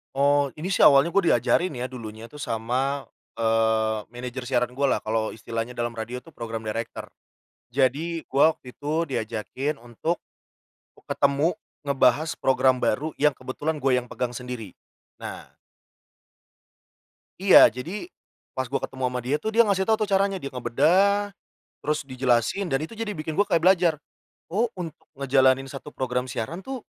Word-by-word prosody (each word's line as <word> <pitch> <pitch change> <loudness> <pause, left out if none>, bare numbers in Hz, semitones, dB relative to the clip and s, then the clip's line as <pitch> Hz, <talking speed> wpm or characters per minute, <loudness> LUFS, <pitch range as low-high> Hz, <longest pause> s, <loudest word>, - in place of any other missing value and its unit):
Oh, 145 +1 +3
ini 175 +6 -4
sih - - +1
awalnya 140 +4 +7
gua 200 +1 +3
diajarin 175 -5 +2
ya 125 +1 -4
dulunya 115 -2 -8
tuh 150 - -11
sama, 130 +4 -1 0.3
eee, 110 -1 +2
manager 125 +1 -6
siaran 125 -1 +1
gua 135 +1 +1
lah - - -2
kalo 110 0 -1
istilahnya 115 +2 -4
dalam 120 0 -2
radio 120 +2 -6
tuh 165 - -15
program 115 -3 -6
director. 110 +2 -5 0.6
Jadi, 145 +6 +1
gua 145 +4 +5
waktu 125 -5 -13
itu 155 +3 -1
diajakin 125 +4 -3
untuk 120 +9 -3 0.8
k - - -17
ketemu, 140 +5 +2 0.3
ngebahas 140 +3 +3
program 130 -1 +2
baru 150 +7 0
yang 150 -3 +3
kebetulan 145 +5 -3
gua 135 -2 +1
yang 125 - -13
pegang 125 -1 -2
sendiri, 125 -5 -6 0.5
nah - - -8 1.9
Iya, 195 -1 +9
jadi 175 - -6 0.5
pas 130 -1 -3
gua 140 - +1
ketemu 130 -1 -3
sama 125 - -2
dia 130 +4 -1
tuh, 220 +8 -2
dia 235 +1 +6
ngasih 190 -1 +2
tau 220 +2 +2
tuh 215 - 0
caranya, 195 -1 +2
dia 140 - -5
ngebedah, 190 - +2 0.4
terus 150 0 -1
dijelasin 130 - 0
dan 135 -2 0
itu 215 +8 -7
jadi 215 -2 -3
bikin 155 +1 -5
gua 205 - +4
kaya 165 -1 +2
belajar, 175 -4 +4 0.5
"Oh 220 +7 +2
untuk 170 -4 -6 0.2
ngejalanin 135 -1 +3
satu 145 +1 -9
program 125 -1 -1
siaran 125 +7 -4
tuh, 265 -3 -5
135 Hz, 160 wpm, -25 LUFS, 125-165 Hz, 1.9 s, Iya